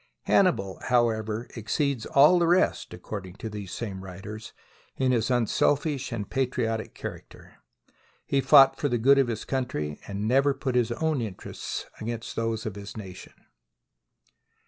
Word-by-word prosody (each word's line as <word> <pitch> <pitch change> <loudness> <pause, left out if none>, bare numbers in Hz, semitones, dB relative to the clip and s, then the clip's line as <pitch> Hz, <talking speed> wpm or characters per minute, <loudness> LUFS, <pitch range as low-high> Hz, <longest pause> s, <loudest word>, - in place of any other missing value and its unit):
Hannibal, 95 -1 +2
however, 115 -2 +1
exceeds 125 +2 -1
all 150 +6 +6
the 170 - +2
rest 180 +2 +2
(according 95 0 -7
to 110 - -6
these 100 -3 -7
same 95 -5 -5
writers) 100 +4 -8 0.5
in 130 -1 +2
his 120 -1 +1
un 120 -2 +2
selfish 140 +3 0
and 110 -4 -4
patriotic 120 -4 -2
character. - - -9 0.7
He 140 - +1
fought 135 -1 +7
for 145 - 0
the 120 - +1
good 135 +4 +5
of 135 - +3
his 115 -2 -4
country, 100 - -3
and 100 +1 -3
never 135 +3 +3
put 130 - -3
his 120 -2 +2
own 155 0 0
interests 105 -5 -5
against 115 +1 -5
those 115 -1 -2
of 110 - -3
his 100 +2 -9
nation. 95 -4 -9
115 Hz, 150 wpm, -27 LUFS, 105-135 Hz, 0.7 s, fought